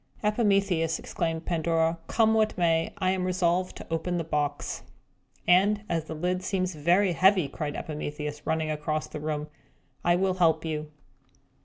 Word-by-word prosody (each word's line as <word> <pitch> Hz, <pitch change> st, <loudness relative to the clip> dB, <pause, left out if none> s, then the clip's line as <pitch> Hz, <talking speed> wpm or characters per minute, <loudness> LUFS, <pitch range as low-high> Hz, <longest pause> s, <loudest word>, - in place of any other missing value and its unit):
"Epimetheus," 195 Hz, -6 st, +2 dB
exclaimed 165 Hz, -1 st, -3 dB
Pandora, 165 Hz, -1 st, +1 dB
"come 220 Hz, -1 st, +3 dB
what 220 Hz, -1 st, +2 dB
may, 165 Hz, -2 st, +2 dB
I 185 Hz, 0 st, +1 dB
am 185 Hz, -1 st, -1 dB
resolved 180 Hz, 0 st, +1 dB
to -, -, -9 dB
open 175 Hz, +2 st, -1 dB
the 170 Hz, -, -1 dB
box!" 145 Hz, -2 st, -2 dB, 0.7 s
"And, 205 Hz, +4 st, +4 dB
as 165 Hz, -4 st, -1 dB
the 160 Hz, -, -6 dB
lid 180 Hz, +3 st, -1 dB
seems 185 Hz, -1 st, -1 dB
very 175 Hz, +6 st, +3 dB
heavy," 185 Hz, -2 st, +4 dB
cried 145 Hz, +1 st, -4 dB
Epimetheus, 150 Hz, -1 st, -5 dB
running 160 Hz, -1 st, 0 dB
across 155 Hz, 0 st, -2 dB
the -, -, -7 dB
room, 150 Hz, 0 st, -3 dB, 0.6 s
"I 175 Hz, -, +4 dB
will 190 Hz, +1 st, +1 dB
help 165 Hz, -3 st, +2 dB
you!" 155 Hz, -1 st, -3 dB
170 Hz, 155 wpm, -27 LUFS, 155-185 Hz, 0.7 s, And